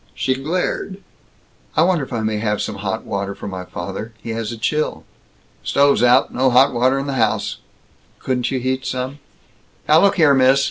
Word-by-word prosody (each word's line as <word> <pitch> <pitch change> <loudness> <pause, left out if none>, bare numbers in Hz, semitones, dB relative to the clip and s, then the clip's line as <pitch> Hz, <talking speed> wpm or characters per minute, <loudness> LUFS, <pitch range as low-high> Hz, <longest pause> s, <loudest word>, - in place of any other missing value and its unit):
She 130 - 0
glared. 175 +7 -2 0.8
"I 160 - +6
wonder 175 -4 +2
if - - -9
I 115 -3 -2
may 110 0 -1
have 105 -1 -1
some 105 - -3
hot 100 -1 -3
water 100 0 -3
for 100 - -8
my 95 -2 -6
father? 100 +6 -6
He 115 - -7
has 115 -1 -3
a 115 - -6
chill." 150 +7 -1 0.6
"Stove's 140 -2 +3
out. 125 +2 +4
No 130 +1 +2
hot 130 +2 +5
water 130 +3 +2
in 135 - -2
the 140 - -3
house." 110 - 0 0.6
"Couldn't 125 -2 -1
you 130 - -1
heat 130 +1 -2
some?" 130 +3 -4 0.7
"Now 155 +2 +6
look 200 - +4
here, 155 -5 +5
miss. 135 0 +5
130 Hz, 190 wpm, -20 LUFS, 110-140 Hz, 0.8 s, I